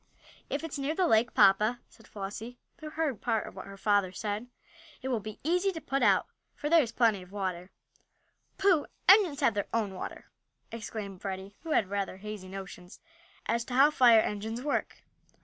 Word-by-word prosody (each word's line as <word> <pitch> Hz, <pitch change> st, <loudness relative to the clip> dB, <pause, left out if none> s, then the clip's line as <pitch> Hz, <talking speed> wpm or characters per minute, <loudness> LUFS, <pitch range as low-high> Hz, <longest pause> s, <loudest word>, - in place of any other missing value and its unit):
"If 285 Hz, -, -2 dB
it's 310 Hz, -3 st, -5 dB
near 280 Hz, +3 st, -1 dB
the 370 Hz, -, +2 dB
lake, 230 Hz, -4 st, +3 dB
papa," 210 Hz, +5 st, +5 dB
said 225 Hz, -, -20 dB
Flossie 210 Hz, +4 st, -7 dB, 0.2 s
who 310 Hz, -1 st, -7 dB
heard 305 Hz, -7 st, -2 dB
part 220 Hz, -, 0 dB
of -, -, -10 dB
what 190 Hz, -, -8 dB
her 195 Hz, 0 st, -10 dB
father 205 Hz, -2 st, +2 dB
said, 210 Hz, +4 st, -4 dB, 0.6 s
"it 265 Hz, -, -2 dB
will 245 Hz, -3 st, 0 dB
be 215 Hz, 0 st, -8 dB
easy 360 Hz, +5 st, +2 dB
to 325 Hz, -, -5 dB
put 275 Hz, -3 st, -2 dB
it -, -, +4 dB
out, -, -, +4 dB, 0.3 s
for 295 Hz, -, -4 dB
there 335 Hz, -1 st, +7 dB
is 235 Hz, -5 st, -3 dB
plenty 225 Hz, -5 st, +2 dB
of 180 Hz, 0 st, -14 dB
water." 185 Hz, -3 st, -4 dB, 0.9 s
"Pooh! 380 Hz, -6 st, +3 dB, 0.2 s
engines 370 Hz, -8 st, +6 dB
have 255 Hz, -5 st, +4 dB
their 205 Hz, -1 st, -2 dB
own 215 Hz, -4 st, -1 dB
water!" 185 Hz, -, -8 dB, 0.4 s
exclaimed 210 Hz, -4 st, -6 dB
Freddie, 195 Hz, +1 st, -6 dB
who 330 Hz, -, -9 dB
had 200 Hz, -3 st, +1 dB
rather 200 Hz, -2 st, -2 dB
hazy 210 Hz, -1 st, -7 dB
notions 190 Hz, -2 st, -9 dB, 0.5 s
as 235 Hz, 0 st, 0 dB
to 250 Hz, -, -5 dB
how 280 Hz, +3 st, +6 dB
fire 240 Hz, -6 st, +6 dB
engines 220 Hz, +4 st, -4 dB
work. 295 Hz, -, -2 dB
220 Hz, 190 wpm, -30 LUFS, 200-280 Hz, 0.9 s, there